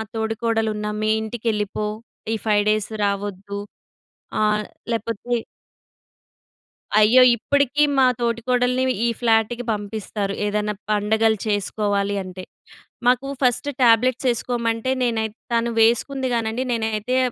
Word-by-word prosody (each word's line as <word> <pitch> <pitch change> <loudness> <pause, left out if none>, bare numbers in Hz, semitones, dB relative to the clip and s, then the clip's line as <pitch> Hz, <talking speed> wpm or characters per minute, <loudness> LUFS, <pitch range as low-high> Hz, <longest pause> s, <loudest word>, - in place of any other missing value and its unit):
తోడికోడలున్నా 220 -1 -1
మీ 215 - +1
ఇంటికెళ్ళిపో, 215 -2 -2 0.5
ఈ - - +1
5 205 -1 +3
డేస్ 215 -1 0
రావొద్దు, 200 0 -3 0.8
ఆహ్, 210 0 +2 0.3
లేపోతే 230 +1 -2 1.7
అయ్యో! 235 +5 +7
ఇప్పడకీ 285 +4 +2
మా 260 - +6
తోటికోడలిని 250 +2 +1
ఈ - - +2
ఫ్లాటుకి 235 +1 +2
పంపిస్తారు, 205 -1 -4
ఏదన్నా 210 0 -1 0.2
పండగలు 220 +1 +2
చేసుకోవాలి 205 -1 0
అంటే. 185 0 -8 0.6
మాకూ 250 +2 +3
ఫస్ట్ 250 +2 +1
టాబ్లెట్సేసుకోమంటే, 235 0 +2
నేనైత్ 220 -2 -1 0.2
తను 235 0 +1
వేసుకుంది 260 +4 +2
గానండి, 230 +2 -1
నేనైతే 225 +1 -1
225 Hz, 95 wpm, -22 LUFS, 210-240 Hz, 1.7 s, అయ్యో